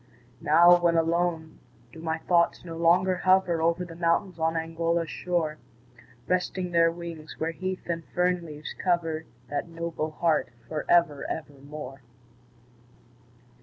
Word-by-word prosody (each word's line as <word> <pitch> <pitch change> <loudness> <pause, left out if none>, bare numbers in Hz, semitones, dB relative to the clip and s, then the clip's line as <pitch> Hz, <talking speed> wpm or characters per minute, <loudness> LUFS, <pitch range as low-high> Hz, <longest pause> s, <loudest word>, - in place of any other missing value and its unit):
Now, 175 +3 +6
when 170 -1 +3
alone, 165 -1 0 0.3
do 160 - -10
my 160 -1 -1
thoughts 170 +1 +1
no 165 -1 -7
longer 180 +3 +3
hover 185 -2 +3
Over 170 +2 +1
the 165 -1 -10
mountains 170 +2 0
on 160 +1 +1
Angora's 165 0 -1
shore, 165 -4 -2 0.7
Resting 180 0 -1
their 165 -1 +4
wings, 165 -2 -8
where 165 +1 -1
heath 185 +2 -5
and 170 -1 -2
fern 180 0 +2
leaves 150 -2 -8
cover 165 -3 -1 0.3
That 145 +3 -2
noble 165 -1 -3
heart 155 -3 +1 0.2
for 155 -1 -4
ever, 170 -5 +3
ever 145 - -5
more? 140 0 -9
165 Hz, 135 wpm, -27 LUFS, 160-175 Hz, 0.7 s, Now